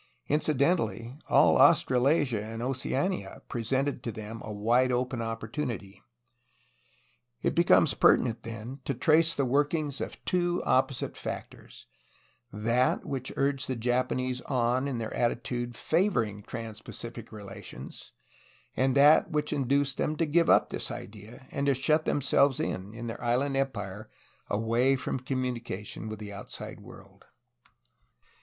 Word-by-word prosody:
Incidentally, 140 -5 +1
all - - +5
Australasia 130 -3 +4
and 115 +2 -6
Oceania 135 +8 -2
presented 130 +3 -1
to 115 - -4
them 110 +1 -7
a 110 - -6
wide 120 +5 +2
open 125 0 -1
opportunity. 115 -3 -4 1.4
It - - +1
becomes 170 -3 +4
pertinent, 115 -2 +3
then, 115 +4 -7
to 140 - -1
trace 160 +5 +4
the 140 - +1
work 145 +5 +2
ings 150 -3 -3
of - - -5
two 175 -1 0
opposite 130 -1 +1
factors: - - -8 0.7
that 115 +4 +1
which 130 -2 -4
urged 140 -1 0
the 130 - -2
Japanese 125 +1 0
on 125 0 +1
in 135 -3 -2
their 110 -1 -4
attitude 120 0 -1
favoring 115 - +1
trans 110 0 -7
Pacific 115 0 -8
relations; 100 - -10 0.6
and 130 0 +2
that 145 +3 +6
which 150 -2 -1
induced 140 0 +1
them 155 - 0
to 165 - +1
give 165 +2 +2
up - - +5
this - - -3
idea 110 +5 -9
and 140 0 -1
to 140 - +4
shut 155 +4 +2
them 145 - 0
selves 140 0 +3
in, 95 +2 -3
in 120 0 -6
their 115 +1 -6
island 130 +4 +1
empire, 110 -7 -3 0.4
away 115 +5 +2
from 130 0 -3
communication 120 -5 -4
with 110 - -5
the 105 -1 -8
outside 100 - -8
world. - - -15
125 Hz, 135 wpm, -29 LUFS, 115-140 Hz, 1.4 s, that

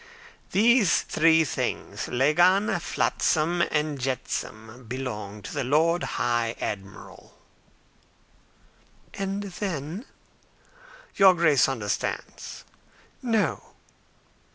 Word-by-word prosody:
"These 220 -1 +4
three 160 +1 +4
things 150 - -3
lagan, 175 +9 +3
flotsam, 170 0 0
and 150 -2 -1
jetsam 125 -2 -4
belong 105 -5 -5
to - - -7
the 140 - -1
Lord 160 +6 +2 0.2
High 120 -1 0
Admiral." 95 -2 -7 1.8
"And 195 +1 -3
then?" 185 - -5 1.1
"Your 190 -2 +7
Grace 155 -6 +4
understands." 105 -7 -4 0.6
"No." 225 -4 0
155 Hz, 80 wpm, -26 LUFS, 125-185 Hz, 1.8 s, Your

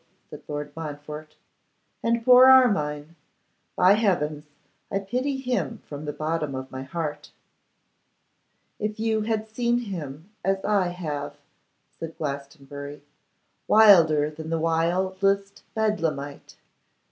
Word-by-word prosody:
said - - -9
Lord 145 -1 -5
Montfort, 150 -1 -7 0.7
'and 230 0 0
poor 255 0 +8
Armine! 165 - +4 0.6
By 185 +2 +6
heavens, 155 -9 0 0.4
I 195 - -1
pity 250 +8 -2
him 250 -3 -2
from 145 +1 -8
the 150 - -2
bottom 155 -2 -2
of 130 0 -6
my 130 - -6
heart.' 150 +1 -5 1.5
'If 210 0 -3
you 220 -1 +1
had 220 0 -1
seen 235 +2 0
him 175 - -6
as 195 0 0
I 200 -3 +2
have,' 155 -5 -5 0.6
said 165 0 -7
Glastonbury, 140 0 -6 0.6
'wilder 165 -9 +6
than 160 +1 -8
the 165 - 0
wildest 190 +5 0
Bedlamite! 165 -10 -2
165 Hz, 110 wpm, -25 LUFS, 150-215 Hz, 1.5 s, poor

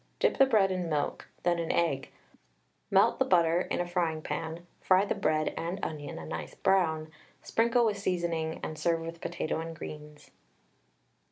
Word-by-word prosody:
Dip - - +2
the 270 - +7
bread 205 -6 +4
in 180 -2 -2
milk, 150 -2 -2 0.2
then 175 -1 +2
in 165 - -1
egg; 150 -6 0 0.8
melt - - +4
the - - +5
butter 170 -1 +3
in - - -2
a 175 - 0
frying 170 -3 -1
pan, 160 +3 -4
fry 190 +1 +4
the - - 0
bread 155 0 0
and 170 +3 -3
onion 145 -2 -4
a 80 - -7
nice 80 -1 -6
brown, 160 -5 +1 0.3
sprinkle 235 +1 +2
with 210 -2 0
seasoning 170 -4 -1
and 155 - -5
serve 165 -1 +1
with 165 +1 -7
potato 170 -2 -2
and 165 0 -5
greens. 150 -1 -10
165 Hz, 170 wpm, -30 LUFS, 155-180 Hz, 0.8 s, the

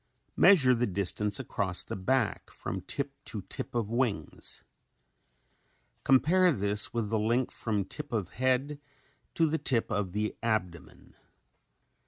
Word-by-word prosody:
Measure 140 -11 +6
the 120 0 +1
distance 100 +2 0
across 95 -3 -1
the - - -6
back 120 +4 0
from 95 - -5
tip 140 +9 -3
to 105 -4 -6
tip - - -7
of 115 -2 -1
wings. 115 - -2 1.4
Compare 175 +7 +4
this 105 -4 +1
with 115 -3 -2
the 110 - +1
length 115 +4 0
from 105 -4 -2
tip 150 +8 -7
of 105 -7 -2
head 130 +4 0 0.6
to 165 - +3
the 160 +1 -1
tip 120 -3 0
of 105 -4 -1
the 105 +1 -1
abdomen. 100 -7 -3
115 Hz, 135 wpm, -29 LUFS, 100-130 Hz, 1.4 s, Measure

